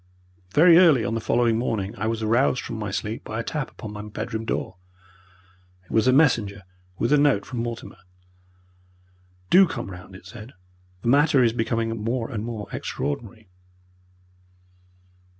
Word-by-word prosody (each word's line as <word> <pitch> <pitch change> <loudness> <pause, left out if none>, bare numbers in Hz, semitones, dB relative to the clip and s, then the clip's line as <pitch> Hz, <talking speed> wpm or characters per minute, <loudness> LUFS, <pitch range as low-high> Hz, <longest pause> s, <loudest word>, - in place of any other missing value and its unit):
Very 170 +2 +7
early 150 - +5
on 115 - -2
the 115 - -2
following 115 0 +2
morning 110 -4 -2
I 110 - -3
was 115 0 -2
aroused 120 +4 +2
from 115 - -6
my 105 -2 -3
sleep 105 +3 -4
by 110 +1 -5
a - - -2
tap 150 +1 -3
upon 110 -4 -9
my 105 - -6
bedroom 110 +2 -5
door. - - -3 1.1
It - - -17
was 110 +2 +2
a - - +6
messenger 115 -9 +2 0.3
with 120 +8 +1
a 150 - +5
note 140 -9 +3
from 125 - -5
Mortimer. 115 0 -6 1.5
"Do 190 +1 +7
come 120 -10 -6
round," 90 +1 -11
it 95 - -14
said; 110 +5 -11 0.5
"the - - -3
matter 140 +1 +4
is 115 -2 +2
becoming 115 -1 -2
more 115 +1 -2
and 110 -3 -4
more 110 -3 -5
extraordinary." 110 +7 -5
115 Hz, 160 wpm, -24 LUFS, 105-125 Hz, 1.5 s, Very